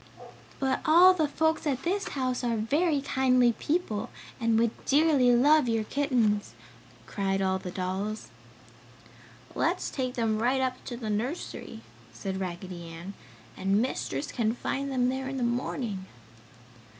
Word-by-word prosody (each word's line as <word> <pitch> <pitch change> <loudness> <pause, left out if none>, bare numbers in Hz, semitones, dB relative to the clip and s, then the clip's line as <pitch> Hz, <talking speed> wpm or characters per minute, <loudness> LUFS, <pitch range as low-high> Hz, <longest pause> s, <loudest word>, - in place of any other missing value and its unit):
"But 265 -1 0
all 350 +4 +7
the 320 -4 +1
folks 320 +2 0
at 270 -2 -1
this 395 +4 -1
house 255 -1 -1
are 235 -2 0
very 290 +7 +1
kindly 255 -3 +3
people 260 -4 -2 0.3
and 230 -2 +2
would 230 0 +3
dearly 285 -4 +4
love 290 +1 +5
your 225 -1 +1
kittens!" 225 - 0 0.5
cried 195 - -1
all 190 -1 +1
the 185 - -6
dolls. 190 +4 -3 1.2
"Let's - - 0
take 255 -2 -3
them 225 -3 0
right 255 +3 +2
up 255 -1 -2
to 240 - -5
the 220 -3 -4
nursery!" 225 - -4 0.3
said 190 +11 -4
Raggedy 180 -1 -6
Ann, 170 +4 -8 0.4
"And 195 +2 +1
Mistress 185 - -2
can 225 -1 0
find 275 +2 -3
them 250 -1 +2
there 265 +1 -3
in 270 - -4
the 255 - -1
morning!" 235 -5 -2
245 Hz, 145 wpm, -28 LUFS, 205-275 Hz, 1.2 s, all